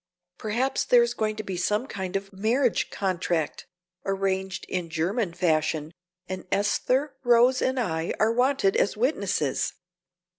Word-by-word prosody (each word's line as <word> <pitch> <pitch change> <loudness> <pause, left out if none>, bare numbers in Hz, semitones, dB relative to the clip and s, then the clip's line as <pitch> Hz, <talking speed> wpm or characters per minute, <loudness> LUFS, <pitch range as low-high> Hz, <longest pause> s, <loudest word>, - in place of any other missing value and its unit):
Perhaps 235 +5 0
there - - +6
is 475 - -1
going 215 -1 -1
to 215 - -5
be 195 -3 -4
some 210 +6 0
kind 190 -6 -5
of 195 0 -3
marriage 230 +5 +1
contract, 175 -5 -2 0.4
arranged 190 -1 -1
in 180 -2 -3
German 175 +5 -1
fashion, 160 -2 0 0.3
and 185 0 -6
Esther, 255 +8 +1
Rose 245 +1 +5
and 260 0 +1
I 160 -7 -1
are 220 +1 +4
wanted 250 -5 +2
as 200 - +1
witnesses. 200 - 0
200 Hz, 140 wpm, -26 LUFS, 180-245 Hz, 0.4 s, there